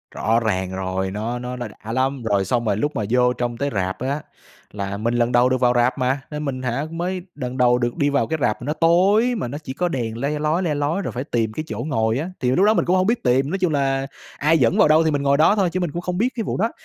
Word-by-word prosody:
Rõ 115 +2 +2
ràng 95 -5 -1
rồi, 95 0 -2
nó 115 +5 -3
nó 125 +1 -5
nó 120 -2 -5 0.2
đã 110 - -5
lắm! 130 0 0
Rồi 100 -3 +1
xong 120 +4 0
rồi 100 -2 +1
lúc 145 +7 -1
mà 110 - -1
vô 125 0 +3
trong 120 -1 -3
tới 140 +2 -1
rạp 95 -1 -2
á, 140 +4 -2 0.5
là 100 -1 -4
mình 115 +3 -1
lần 120 0 +1
đầu 125 +1 +4
được 130 -1 +1
vào 125 -1 +4
rạp 120 +1 +2
mà, 130 +1 0
nên 150 0 -4
mình 130 -2 -3
hả, 130 +4 -1
mới 180 +2 -3
đần 130 -2 -5
đầu 125 -1 +4
được 120 +2 -2
đi 145 -3 +2
vào 140 - +1
cái 160 - -1
rạp 120 -4 0
mà - - -6
nó 150 - -1
tối, 190 +9 +3
mà 165 - -3
nó 140 +4 -5
chỉ 130 - -6
có 180 +5 -1
đèn 115 -7 -3
le 145 +4 -2
lói, 155 +4 0
le 155 -4 0
lói, 145 +7 -1
rồi - - -4
phải 125 +2 -4
tìm 115 -6 -1
cái 155 - -4
chỗ 105 - -5
ngồi 115 -4 0
á, 165 +5 -3
thì 125 -1 +1
lúc 185 +9 +3
đó 215 - +5
mình - - +1
cũng 180 - +2
hông 185 +1 +2
biết 235 +1 0
tìm. 130 +2 +2
Nói 195 - -1
chung 175 -4 +1
là 135 -1 0 0.3
ai 155 +3 +3
dẫn 120 -5 +2
vào - - +6
đâu 155 +2 +5
thì 160 - +1
mình 145 -1 0
ngồi 140 0 +3
đó 160 +6 +5
thôi 195 -4 +2
chứ 185 - 0
mình 175 -4 -2
cũng 175 +4 -4
không 180 0 -3
biết 235 +6 +2
cái 225 - -2
vụ - - -3
đó, 225 +4 +1
135 Hz, 300 wpm, -22 LUFS, 120-160 Hz, 0.5 s, vào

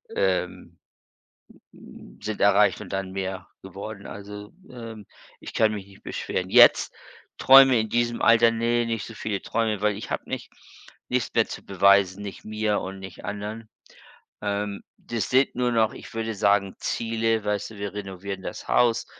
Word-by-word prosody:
ähm - - -1 1.5
sind 110 -1 -4
erreicht 100 +1 +4
und - - -10
dann 95 -1 -3
mehr 95 -1 -5
geworden. 100 +2 -8
Also, 105 +1 -9 0.2
ähm, 115 -4 -9 0.3
ich - - -10
kann 110 -1 +3
mich 100 -2 -6
nicht 100 -1 -18
beschweren. - - -4
Jetzt - - +6 0.4
träume 135 -2 +7
in 110 - -2
diesem 120 +1 0
Alter, 115 0 +6
ne, 115 +1 +1
nicht 115 -2 -3
so 115 - -10
viele 105 -2 -3
Träume, 110 -3 -1
weil 105 -1 +1
ich 105 - -8
habe - - -4
nicht - - -5 0.6
nichts - - -1
mehr - - +3
zu - - -8
beweisen, 100 0 +3
nicht 100 -2 -8
mir 110 -1 -1
und 95 +1 -6
nicht 95 -2 -10
anderen. 105 +2 -6 0.7
Ähm, 100 0 -3 0.2
das 115 -2 -4
sind 130 +2 +3
nur 125 0 0
noch, 110 -2 +2
ich - - -11
würde 115 -1 -3
sagen, 100 -1 +2
Ziele, 115 -1 -1
weißt 105 0 -2
du, 110 - -12
wir 100 0 -5
renovieren 95 -1 -6
das - - -7
Haus. 120 -2 +2
105 Hz, 165 wpm, -25 LUFS, 100-115 Hz, 1.5 s, träume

